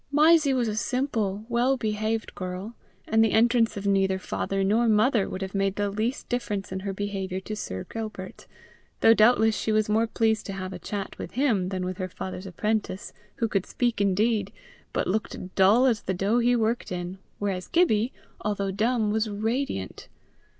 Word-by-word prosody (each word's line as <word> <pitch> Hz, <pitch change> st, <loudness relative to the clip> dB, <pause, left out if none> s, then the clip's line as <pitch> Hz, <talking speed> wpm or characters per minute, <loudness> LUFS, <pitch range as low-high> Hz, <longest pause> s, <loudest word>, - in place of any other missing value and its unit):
Mysie 305 Hz, 0 st, +5 dB
was 245 Hz, -2 st, +1 dB
a 210 Hz, -, -2 dB
simple, 220 Hz, -5 st, -1 dB
well 245 Hz, +3 st, +2 dB
behaved 215 Hz, 0 st, -2 dB
girl, 185 Hz, +4 st, -5 dB, 0.3 s
and 220 Hz, 0 st, +4 dB
the 220 Hz, -, +2 dB
entrance 230 Hz, -1 st, +3 dB
of 200 Hz, -, -5 dB
neither 195 Hz, -1 st, +2 dB
father 195 Hz, +1 st, -2 dB
nor 220 Hz, +5 st, +3 dB
mother 215 Hz, 0 st, +3 dB
would 190 Hz, -, -4 dB
have 190 Hz, -, -6 dB
made 195 Hz, -1 st, 0 dB
the 205 Hz, -1 st, -1 dB
least 220 Hz, +6 st, -2 dB
difference 210 Hz, -6 st, -3 dB
in 190 Hz, -, -3 dB
her 195 Hz, +1 st, -3 dB
behaviour 195 Hz, -1 st, -3 dB
to 215 Hz, +3 st, -5 dB
Sir 95 Hz, -, -5 dB
Gilbert, 215 Hz, -4 st, -7 dB, 0.5 s
though 225 Hz, -, +7 dB
doubtless 220 Hz, 0 st, +4 dB
she 220 Hz, -, -1 dB
was 215 Hz, 0 st, +2 dB
more 220 Hz, +2 st, +2 dB
pleased 220 Hz, -1 st, 0 dB
to 195 Hz, -, -4 dB
have 190 Hz, 0 st, -5 dB
a 180 Hz, -, -7 dB
chat 200 Hz, +2 st, -5 dB
with -, -, -6 dB
him 225 Hz, -9 st, +1 dB
than 185 Hz, -1 st, -3 dB
with 185 Hz, +1 st, -4 dB
her 185 Hz, 0 st, -3 dB
father's 185 Hz, +1 st, -6 dB
apprentice, 205 Hz, +1 st, -2 dB, 0.2 s
who 230 Hz, -, 0 dB
could 195 Hz, -3 st, -1 dB
speak 240 Hz, -4 st, 0 dB
indeed, 200 Hz, +1 st, +1 dB, 0.4 s
but -, -, -1 dB
looked 185 Hz, -2 st, -3 dB
dull 205 Hz, +7 st, +5 dB
as 235 Hz, -5 st, +2 dB
the 190 Hz, -, -2 dB
dough 200 Hz, +6 st, +1 dB
he 245 Hz, +1 st, +3 dB
worked 230 Hz, -1 st, 0 dB
in, 180 Hz, +1 st, -4 dB, 0.2 s
whereas 190 Hz, -3 st, -2 dB
Gibbie, 255 Hz, -9 st, +2 dB, 0.3 s
although 200 Hz, -2 st, -1 dB
dumb, 220 Hz, +2 st, +1 dB
was 220 Hz, 0 st, 0 dB
radiant. 220 Hz, -, -3 dB
210 Hz, 185 wpm, -26 LUFS, 195-230 Hz, 0.5 s, though